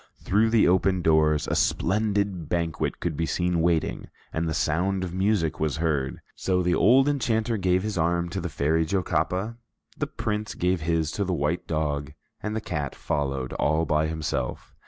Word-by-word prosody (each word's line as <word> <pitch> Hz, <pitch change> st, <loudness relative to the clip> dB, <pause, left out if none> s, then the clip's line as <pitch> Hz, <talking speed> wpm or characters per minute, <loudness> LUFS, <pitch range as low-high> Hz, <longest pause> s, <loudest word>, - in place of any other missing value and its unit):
Through 110 Hz, +4 st, +2 dB
the 115 Hz, -2 st, +4 dB
open 95 Hz, 0 st, +2 dB
doors, 80 Hz, -1 st, +3 dB
a -, -, -1 dB
splendid 100 Hz, -4 st, 0 dB
banquet 85 Hz, -2 st, -1 dB
could 85 Hz, -3 st, -2 dB
be 80 Hz, +2 st, -1 dB
seen 90 Hz, -1 st, 0 dB
waiting, 85 Hz, -1 st, 0 dB, 0.3 s
and 80 Hz, +1 st, -1 dB
the -, -, -1 dB
sound 90 Hz, +5 st, 0 dB
of 90 Hz, -2 st, -4 dB
music 95 Hz, -4 st, +1 dB
was 75 Hz, -1 st, 0 dB
heard. 75 Hz, -5 st, -1 dB
So 90 Hz, -1 st, 0 dB
the 90 Hz, 0 st, +2 dB
old 130 Hz, +10 st, +5 dB
enchanter 115 Hz, -5 st, +1 dB
gave 90 Hz, -2 st, +1 dB
his 105 Hz, -4 st, -2 dB
arm 85 Hz, +1 st, +1 dB
to 95 Hz, +2 st, -3 dB
the 90 Hz, -, -3 dB
Fairy 80 Hz, +3 st, +1 dB
Jocapa, 90 Hz, +4 st, -1 dB, 0.4 s
the -, -, -2 dB
Prince 105 Hz, 0 st, -3 dB
gave 90 Hz, -1 st, 0 dB
his 80 Hz, -1 st, 0 dB
to 100 Hz, -, -1 dB
the 95 Hz, -2 st, -1 dB
white 75 Hz, +3 st, -1 dB
dog, 75 Hz, -2 st, -2 dB, 0.3 s
and 105 Hz, 0 st, -3 dB
the 110 Hz, -, -1 dB
cat 75 Hz, -9 st, -3 dB
followed 70 Hz, -3 st, -2 dB
all 80 Hz, +2 st, +1 dB
by 75 Hz, 0 st, +1 dB
himself. 80 Hz, -6 st, -3 dB
85 Hz, 180 wpm, -26 LUFS, 80-95 Hz, 0.4 s, old